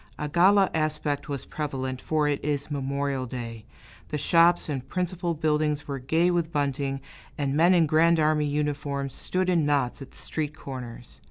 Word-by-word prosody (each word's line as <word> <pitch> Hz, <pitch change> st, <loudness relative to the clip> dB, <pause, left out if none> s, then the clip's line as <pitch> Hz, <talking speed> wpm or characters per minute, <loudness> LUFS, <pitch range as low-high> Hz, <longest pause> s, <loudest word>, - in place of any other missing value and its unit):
A 150 Hz, -, -3 dB
gala 190 Hz, +5 st, +4 dB
aspect 155 Hz, -2 st, -1 dB
was 140 Hz, -2 st, -4 dB
prevalent, 130 Hz, -4 st, -4 dB
for 155 Hz, -2 st, +1 dB
it 145 Hz, -1 st, -1 dB
is 145 Hz, 0 st, -2 dB
Memorial 140 Hz, -1 st, -2 dB
Day; 115 Hz, -3 st, -6 dB, 0.4 s
the 150 Hz, -, -2 dB
shops 170 Hz, +3 st, +4 dB
and 135 Hz, -4 st, -4 dB
principal 180 Hz, -2 st, -2 dB
buildings 150 Hz, -1 st, 0 dB
were 140 Hz, -1 st, -3 dB
gay 160 Hz, +7 st, +2 dB
with 170 Hz, -2 st, 0 dB
bunting, 140 Hz, -2 st, -1 dB, 0.4 s
and 140 Hz, -1 st, -1 dB
men 170 Hz, +4 st, +5 dB
in 170 Hz, -2 st, +5 dB
Grand 160 Hz, +2 st, +4 dB
Army 150 Hz, -1 st, +2 dB
uniforms 145 Hz, -2 st, -2 dB
stood 185 Hz, +5 st, -2 dB
in 175 Hz, -3 st, +3 dB
knots 140 Hz, -3 st, 0 dB
at 135 Hz, -, -8 dB
the -, -, -20 dB
street 150 Hz, -2 st, -4 dB
corners. 125 Hz, -3 st, -8 dB
150 Hz, 170 wpm, -26 LUFS, 140-160 Hz, 0.4 s, men